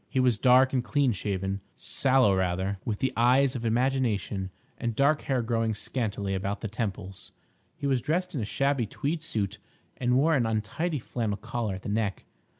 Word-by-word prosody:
He 130 - 0
was 125 -4 +3
dark 130 +1 +5
and 125 -2 +1
clean 140 0 +2
shaven, 95 -1 -2 0.2
sallow 130 -7 +3
rather, 95 +1 -1
with 105 -3 -2
the 130 - -1
eyes 130 +3 +4
of 120 - -4
imagination, 115 -5 0 0.3
and 115 -2 -2
dark 140 +4 +3
hair 130 -3 0
growing 115 -1 0
scantily 100 -4 -3
about 100 +2 -2
the 110 - -2
temples. 100 -3 -5 0.4
He 150 - -5
was 135 -3 +2
dressed 180 +7 -1
in 135 - -2
a - - -2
shabby 135 +1 0
tweed 150 +8 -2
suit, 105 - -2 0.4
and 125 0 +2
wore 155 +4 +4
an 125 -6 +2
untidy 115 - -1
flannel 115 -4 -3
collar 115 -3 -3
at 95 - -9
the - - -4
neck. 105 -1 -1
115 Hz, 180 wpm, -28 LUFS, 100-135 Hz, 0.4 s, dark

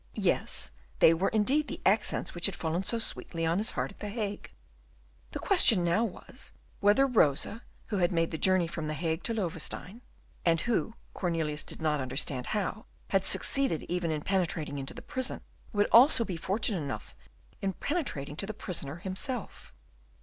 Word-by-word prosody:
Yes, - - +1 0.3
they 165 - +6
were 175 +4 +1
indeed 265 +8 +2
the - - -6
accents 210 +3 +2
which 175 +2 +3
had 195 - -4
fallen 170 +3 -2
so 230 - 0
sweetly 165 -6 -2
on 165 +3 +1
his 215 - +1
heart 130 0 -2
at - - -18
the 210 - -5
Hague. 205 -2 -4 0.8
The - - -5
question 235 - +6
now 175 +6 +2
was, 195 - -8 0.3
whether 205 +7 +4
Rosa, 215 - +2 0.3
who 205 - -1
had 175 -1 +2
made 165 -2 0
the 160 - -4
journey 185 -2 +4
from 165 -2 -5
the 155 - -3
Hague 160 +2 -2
to 230 - 0
Loewestein, 185 +3 -3 0.4
and 165 -1 +2
who 230 -1 -1 0.2
Cornelius 160 -4 -2
did - - -7
not 150 -2 +1
understand 130 0 0
how 215 +1 -3 0.2
had 195 -1 +1
succeeded 270 - +3
even 175 -1 -1
in 155 -1 -2
penetrating 165 -7 -1
into 135 - -6
the - - -9
prison, 260 -2 -2 0.3
would 205 0 +2
also 245 0 +7
be 190 - -4
fortunate 195 +3 0
enough 140 -2 -6 0.5
in 195 -1 -1
penetrating 175 - -3
to 195 - -3
the 220 - -5
prisoner 165 -9 -3
himself. 195 - -4
185 Hz, 175 wpm, -29 LUFS, 160-220 Hz, 0.8 s, also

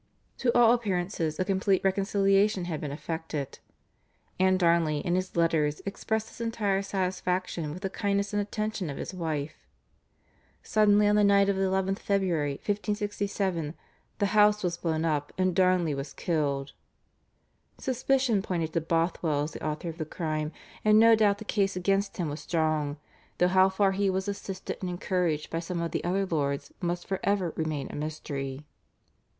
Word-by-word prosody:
To 245 - +2
all 235 -1 +7
appearances 180 -8 -1
a 185 - +1
complete 195 0 +1
reconciliation 195 0 +2
had 165 -4 -4
been 145 - -4
effected, 155 -2 -5 0.8
and 185 0 +4
Darnley 170 -3 +3
in 175 - +1
his 185 +1 -1
letters 160 -3 +2
expressed 220 +2 -2
his - - -11
entire 210 -4 0
satisfaction 185 -4 -2
with 180 +6 -8
the 195 - -1
kindness 200 0 -1
and 205 - +2
attention 210 -3 -3
of 140 - -5
his - - -5
wife. 155 -4 -4 1.0
Suddenly 210 -1 +4
on 205 - +4
the 210 - +4
night 200 0 +5
of 200 - +2
the 190 - -1
11th 190 +1 0
February 175 -8 0
1567 200 -4 -2 0.4
the 205 - +1
house 210 0 +5
was 175 -2 0
blown 165 -2 -1
up, 150 -2 -1
and 185 -1 +1
Darnley 180 -4 +3
was 140 +1 -5
killed. 145 -5 -1 1.0
Suspicion 260 -3 +1
pointed 165 -4 -2
to 165 - +1
Bothwell 165 -2 0
as 150 - -4
the - - -9
author 155 +2 -3
of 165 +1 -8
the 155 - -2
crime, 155 -1 -3 0.3
and 215 0 +6
no 230 +1 +7
doubt 205 -2 +3
the 220 - -9
case 200 -2 0
against 195 +2 0
him 175 -4 -1
was 150 +1 -4
strong, 155 -3 0 0.4
though 180 - +4
how 190 +1 +5
far 195 0 +2
he 195 +1 +1
was 190 +1 -1
assisted 195 -2 -5
and 185 - -2
encouraged 175 -3 -1
by 165 - -1
some 170 +1 -4
of 170 0 -2
the - - -2
other 195 +3 +1
lords 140 -5 -2
must 175 0 -2
for 190 -1 -2
ever 195 -5 +1
remain 155 -4 -2
a - - -7
mystery. 145 -2 -5
185 Hz, 170 wpm, -28 LUFS, 160-200 Hz, 1.0 s, all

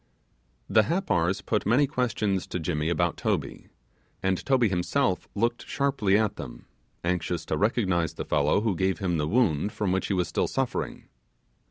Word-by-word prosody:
The 110 -1 +4
Happars 100 - 0
put 105 - 0
many 125 +7 +4
questions 110 -8 -1
to 90 - -3
Jimmy 80 -1 -1
about 85 0 0
Toby; - - -2 0.6
and 95 -1 0
Toby 130 -4 +3
himself 95 +3 0
looked 120 +3 -1
sharply 135 -9 +1
at 110 -2 0
them, - - -8 0.4
anxious 85 -1 -1
to 80 - -1
recognize 95 -4 +1
the - - -5
fellow 75 +6 +2
who 110 -4 0
gave 95 0 0
him 90 -2 -1
the 75 -1 0
wound 105 - +2
from 105 -3 -1
which 95 0 0
he - - 0
was 90 -1 +1
still - - 0
suffering. 135 -2 -3
95 Hz, 165 wpm, -27 LUFS, 85-115 Hz, 0.6 s, The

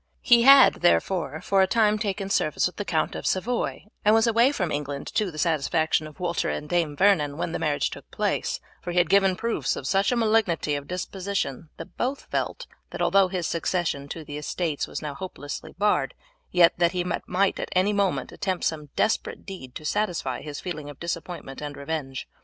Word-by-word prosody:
He 240 -1 +6
had, 275 +1 +7
therefore, 175 -3 +1
for 195 -1 +2
a 190 - +4
time 215 0 +3
taken 200 -2 -2
service 155 - +1
with 180 - -3
the 205 - -3
Count 160 -4 0
of - - -4
Savoy, 230 +4 -1 0.2
and 210 +1 +5
was 225 +1 +4
away 235 +3 +4
from 180 - -2
England, 145 -1 -3
to 210 -3 +1
the 155 - -10
satisfaction 155 0 +1
of 155 +3 -15
Walter 175 -1 -1
and 150 - -4
Dame 165 -3 0
Vernon, 155 -6 +3
when 170 - -2
the - - -3
marriage 150 -3 0
took - - -10
place; - - -1 0.2
for 175 - -5
he - - -3
had 175 +1 +3
given 195 -1 +4
proofs 225 - -1
of 135 - -6
such 195 - +2
a - - +2
malignity 215 -9 +2
of 145 -1 -3
disposition 180 -4 -3
that - - -10
both 270 +3 -2
felt, - - -2 0.2
that - - -7
although 195 -1 +4
his 180 -2 -3
succession 165 -4 -1
to 165 - -6
the 145 0 -6
estates 155 0 -2
was - - -6
now 150 -1 -4
hopelessly 145 -2 -7
barred, 205 +2 +1 0.3
yet 175 -2 +5
that 170 +1 +3
he 180 -1 0
might 185 +2 0
at - - -4
any 185 +3 +2
moment 190 -10 0
attempt 185 -2 -3
some 150 -2 -2
desperate 220 - 0
deed 155 -11 -9
to 155 - -7
satisfy 175 -8 -1
his 150 -1 -6
feeling 150 -5 -6
of 145 - -11
disappointment 170 -4 -5
and 145 -1 -6
revenge. 140 -3 -4
175 Hz, 200 wpm, -25 LUFS, 150-195 Hz, 0.3 s, had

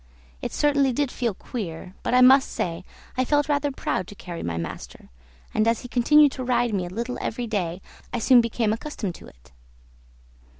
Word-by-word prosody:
It - - -3
certainly 285 -2 +2
did 280 0 0
feel 235 -5 -2
queer; 185 -6 -6
but - - 0
I 250 - +6
must 265 +2 +7
say 170 0 -3 0.3
I 255 - +2
felt 290 +2 +2
rather 290 -1 +1
proud 185 -8 -2
to 205 - -11
carry 175 -3 -7
my 85 -1 -3
master, 85 -6 -7 0.4
and 215 +1 +2
as 230 -1 +2
he 245 - -8
continued 285 +4 +5
to 260 - -5
ride 245 -2 +1
me 185 -3 -1
a - - -7
little 235 +6 -4
every 240 +2 -3
day 185 -5 -3 0.3
I - - -2
soon 240 +1 +6
became 230 -1 0
accustomed 220 - -4
to - - -13
it. - - -19
235 Hz, 195 wpm, -24 LUFS, 185-260 Hz, 0.4 s, must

